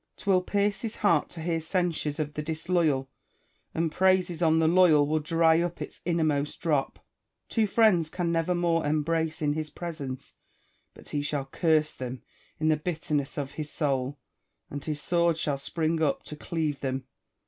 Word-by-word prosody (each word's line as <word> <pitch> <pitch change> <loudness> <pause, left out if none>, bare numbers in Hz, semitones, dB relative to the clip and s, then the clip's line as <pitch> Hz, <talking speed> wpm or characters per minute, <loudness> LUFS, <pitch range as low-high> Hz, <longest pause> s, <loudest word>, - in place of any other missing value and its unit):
'Twill 190 -3 +2
pierce 200 +1 0
his 225 -2 -4
heart 170 -8 +2
to 165 - -9
hear 165 0 -1
censures 165 -3 -1
of 150 -1 -2
the 150 - -3
disloyal; 160 -3 0 0.7
and 165 -1 0
praises 185 -2 +2
on 160 -1 +4
the 160 0 +3
loyal 165 -4 +5
will 155 +2 +1
dry 165 +1 +3
up 175 0 -3
its - - -7
innermost 155 -4 0
drop. 150 -5 -1 0.4
Two 220 -2 +2
friends 195 -7 +4
can 175 -1 -1
never 165 +2 +1
more 170 -1 +1
em 150 +1 +1
brace 160 0 -1
in 145 -1 +2
his 155 0 -3
presence 145 -7 -7 0.6
but - - -14
he 145 - -1
shall 145 -1 -2
curse 155 +1 +1
them 125 0 -6 0.4
in 155 - +1
the 155 - +3
bitter 155 -1 -4
ness 145 -1 -1
of 140 -2 -3
his 150 0 -6
soul, 135 -2 -1 0.5
and 145 -1 -6
his 150 -2 -3
sword 170 0 +2
shall 145 -3 -1
spring 160 +3 -1
up 150 -3 +1
to 150 - -8
cleave 150 -2 -2
them. 130 -1 -3
160 Hz, 180 wpm, -28 LUFS, 145-170 Hz, 0.7 s, loyal